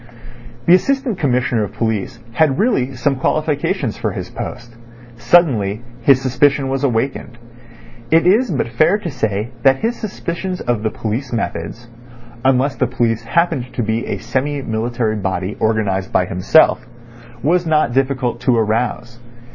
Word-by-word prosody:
The 170 - +6
Assistant 265 +2 +1
Commissioner 125 -5 +1
of 100 - -6
Police 110 -3 -2
had 135 +2 +2
really 135 - +1
some 130 +3 0
qualifications 150 +1 -1
for - - -2
his - - -6
post. 120 -1 -7 0.4
Suddenly 120 - +2 0.2
his 130 +2 +5
suspicion 135 +1 +1
was 135 +1 -2
awakened. 125 -1 -1 0.7
It 165 +1 +4
is 215 +7 +4
but 145 -9 -1
fair 155 - +3
to 180 -6 -5
say 110 -2 -2
that 135 +1 +3
his 235 +2 0
suspicions 185 -2 -4
of 120 -3 -1
the 110 - 0
police 115 +5 -4
methods 120 0 -4 0.6
(unless 135 +1 +2
the 130 - +1
police 115 -2 -1
happened 150 -3 0
to 120 - -1
be 110 +2 -2
a - - -2
semi 140 +1 -2
military 115 -1 -1
body 95 0 -3
organised 105 -4 0
by 90 - +2
himself) 105 - +3 0.6
was 170 +4 +2
not 155 -6 +2
difficult 130 -3 0
to 125 -1 +2
arouse. 115 +2 -1
125 Hz, 145 wpm, -18 LUFS, 115-145 Hz, 0.7 s, The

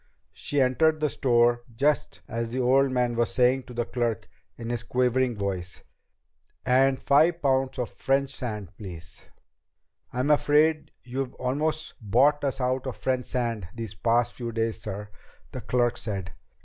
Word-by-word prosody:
She 145 - -2
entered 155 +5 +3
the 150 -1 0
store 120 -1 +3
just 145 +5 0
as 115 -1 -3
the 125 +3 -3
old 135 +2 +4
man 125 -2 +1
was 120 0 +1
saying 130 +1 +3
to 125 - -10
the 120 0 -1
clerk 120 -4 -2 0.3
in 115 0 -5
his 120 -2 -1
quavering 125 0 +1
voice: 95 -3 -4 0.4
"... - - -47
and 130 +1 +4
five 160 +5 +4
pounds 135 0 +1
of 125 -3 -3
French 135 0 0
sand, 105 -8 -5
please." 90 -3 -9 0.8
"I'm 130 +4 0
afraid 150 +1 +3
you've 130 +1 -4
almost 155 +5 -2
bought 135 +8 +3
us 135 -1 -1
out 130 +1 -1
of 130 - -5
French 130 -1 -1
sand 115 -6 -2
these 115 -3 -5
past 115 +6 +1
few 120 -2 -5
days, 115 -1 -2
sir," 105 0 -6 0.4
the - - -6
clerk 120 -1 +1
said. 95 -4 -4
125 Hz, 160 wpm, -26 LUFS, 115-135 Hz, 0.8 s, old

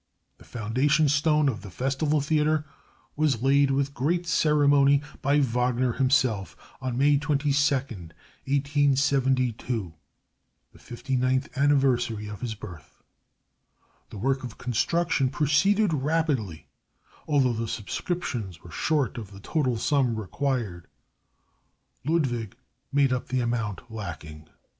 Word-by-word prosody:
The - - -17
foundation 130 +8 +1
stone 150 +1 +3
of 110 -6 -2
the 100 - -9
Festival 135 - 0
Theater 155 0 +1 0.5
was 145 -6 +1
laid 140 +1 +4
with 140 +1 0
great 170 +7 0
ceremony 145 -3 +3 0.2
by 140 +2 +3
Wagner 125 -1 +1
himself 125 -7 +1 0.2
on 130 -2 -3
May 140 +1 +4
22, 145 -1 +1
1872, 130 - -1 0.8
the - - -18
59th 130 +2 -2
anniversary 130 -6 +1
of 105 -1 -8
his 115 -3 -3
birth. 80 -9 -12 1.1
The - - -9
work 130 +5 0
of 120 -3 -7
construction 135 +3 0
proceeded 165 +8 +2
rapidly, 140 - -1 0.6
although 135 -5 +2
the 115 0 -3
subscriptions 110 - -4
were 85 - -12
short 140 - 0
of 105 -4 -8
the 100 -1 -12
total 130 +1 -1
sum 130 -1 +1
required. 110 - -3 1.2
Ludwig 130 - -1 0.4
made 140 -2 +3
up 125 - -3
the 130 0 0
amount 115 -4 -2
lacking. 80 -7 -8
130 Hz, 115 wpm, -26 LUFS, 115-145 Hz, 1.2 s, laid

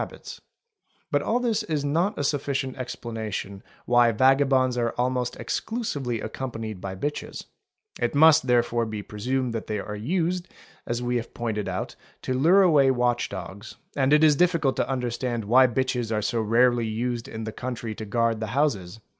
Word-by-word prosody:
habits; - - -8 0.7
but - - +2
all 240 - 0
this 235 -4 0
is 150 -3 -2
not 165 +8 0
a - - -1
sufficient 140 -2 -1
explanation 110 -6 -5 0.2
why 120 -1 +4
vagabonds 130 +1 +3
are 120 -1 +1
_ - - -17
almost 125 0 0
exclusively 145 - -3
accompained 110 -3 -5
by 95 -1 -5
bitches; 145 +9 -4 0.6
it - - 0
must 155 -2 +6
therefore 120 -1 +2
be 105 -1 -5
presumed 125 +4 -2
that 115 - -4
they 105 - -2
are 105 +1 -5
used, 175 - -1 0.4
as 120 +1 -2
we 125 0 0
have 115 - -6
pointed 110 -3 -2
out, - - -4 0.3
to 130 - -1
lure 170 +10 +5
away 150 -7 +5
watch 125 -1 +1
dogs, 95 +3 -8 0.2
and 135 -1 +2
it 150 +1 +5
is 150 -2 +6
difficult 170 -5 +2
to - - -1
understand 120 -3 -2
why 130 +5 +6
bitches 125 -1 -1
are 105 -1 0
so 115 +2 0
rarely 120 +1 +3
used 115 +2 -3
in 110 0 -6
the 110 - -4
country 120 -2 -5
to 110 - -7
guard 115 +1 0
the 110 - -3
houses. 110 -9 0
125 Hz, 175 wpm, -25 LUFS, 110-140 Hz, 0.7 s, must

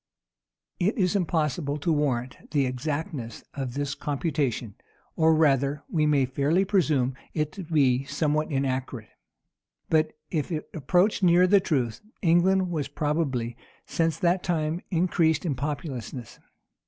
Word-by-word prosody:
[*] - - -56
It 195 +7 +1
is 185 -2 +2
impossible 150 -5 0
to 160 +3 0
warrant 130 -4 -2
the 145 -3 +2
exactness 130 -2 -4
of 135 -3 -4
this 145 -1 -2
computation; 140 - -2 0.4
or 160 0 +4
rather, 140 -2 +2
we 155 -2 +2
may 140 -3 +3
fairly 145 +8 +1
presume 155 -10 +2 0.2
it 155 -2 0
to 195 - -7
be 135 -5 +2
somewhat 150 +2 0
inaccurate. 130 -4 -2 0.8
But 155 -1 +3 0.2
if 160 +1 -1
it 155 -2 -4
approached 180 - +2
near 180 0 +5
the 200 +2 +5
truth, 130 - -1 0.2
England 180 +1 +3
has 145 -3 -1
probably, 140 -5 -1 0.3
since 165 -2 0
that 175 +2 +2
time, 165 0 -1
increased 165 -2 +2
in 155 - 0
populousness. 135 -4 -5
150 Hz, 135 wpm, -26 LUFS, 135-170 Hz, 0.8 s, near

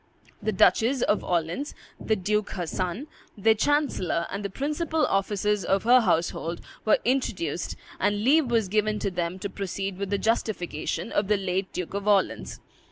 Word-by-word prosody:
The 215 +1 0
Duchess 235 +6 +3
of 210 - +1
Orleans, 175 - -1 0.2
the 220 - +1
Duke 210 +2 -1
her 180 -2 -3
son, 185 - -3 0.3
their 220 +2 +4
chancellor, 220 - +1
and 200 +2 -4
the 200 - -2
principal 300 - -1
officers 205 +1 0
of 195 +2 +1
her 245 +3 +7
household 170 -3 0 0.3
were 215 - +5
introduced, 190 - -1 0.2
and 205 0 +1
leave 285 +2 +4
was 225 -4 +2
given 215 +2 +1
them 180 -3 -2
to 190 - -4
proceed 195 0 -4
with 200 -1 -3
the 200 - +1
justification 195 -5 -1
of 205 - +1
the 210 0 +3
late 190 0 -2
Duke 180 0 -5
of 200 +1 -3
Orleans. 200 -2 +1
200 Hz, 165 wpm, -26 LUFS, 185-225 Hz, 0.3 s, her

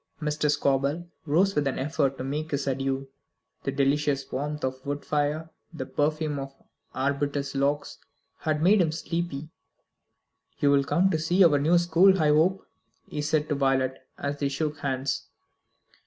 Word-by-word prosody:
Mr. 150 -1 0
Scobel 145 +4 0 0.2
rose 185 +7 +3
with 145 -4 +1
an 135 - -1
effort 135 -1 0
to - - -4
make 150 +4 -3
his 140 -2 -2
adieux. 135 0 -1 0.6
The - - -1
delicious 140 0 0
warmth 150 +3 -3
of 130 0 -2
the 140 - -7
wood 145 0 -3
fire, 150 +2 -1 0.2
the 160 -6 -5
perfume 150 +1 -1
of 135 0 -7 0.4
arbutus 140 +1 -1
logs, 140 +1 -1 0.4
had 155 -1 -1
made 195 +3 +5
him 160 -3 +2
sleepy. 160 -2 -4 1.1
"You'll 140 -1 +3
come 185 +6 +2
and 160 - 0
see 175 +4 +4
our 145 -4 +4
new 160 +5 +4
school, 175 +3 +4
I 155 -2 +3
hope," 165 +6 +3 0.4
he 150 - -3
said 150 0 0
to - - +2
Violet, 135 -2 +1 0.2
as 140 0 -3
they 140 - 0
shook 145 +1 -2
hands. 135 -1 -2
145 Hz, 160 wpm, -27 LUFS, 140-155 Hz, 1.1 s, made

